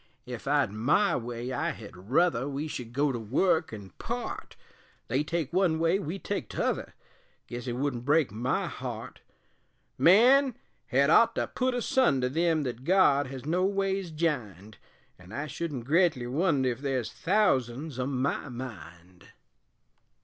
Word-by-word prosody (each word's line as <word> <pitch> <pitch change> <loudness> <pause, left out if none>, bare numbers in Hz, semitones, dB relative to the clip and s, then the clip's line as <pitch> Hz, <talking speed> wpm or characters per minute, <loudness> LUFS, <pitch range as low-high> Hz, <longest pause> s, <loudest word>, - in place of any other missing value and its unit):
Ef 125 0 -7
I'd 140 -6 +2
my 130 - +2
way 120 +1 -4
I - - -1
hed 105 -4 -8
ruther 145 -3 +2
We 145 +2 -3
should 125 -6 -6
go 140 +3 +1
to 120 - -3
work 160 - +1
an' 100 -4 -9
part - - -5 0.5
They 130 +5 +1
take 165 -1 -3
one 180 -3 +2
way, 165 +4 +2
we 180 0 -4
take 195 - -4
t'other - - -2 0.5
Guess 120 +1 -7
it 120 - -2
wouldn't 125 -1 -2
break 145 -1 +2
my 120 +5 -1
heart; - - -7 0.8
Man 250 +8 +6 0.3
hed 140 +3 +3
ought 230 - +5
to - - 0
put 255 0 -1
asunder 180 - +2
Them 165 +1 +1
thet 125 -2 -5
God 145 -5 +4
has 130 0 -8
noways 190 +2 0
jined; 115 - -3 0.4
An' 90 +1 -15
I 145 +6 -3
shouldn't 150 -5 -5
gretly 155 -4 +2
wonder 135 -1 +1
Ef 120 - -6
there's 135 -4 -2
thousands 140 - 0
o' 125 - -1
my 140 +1 -1
mind. 90 -8 -10
140 Hz, 150 wpm, -28 LUFS, 120-170 Hz, 0.8 s, Man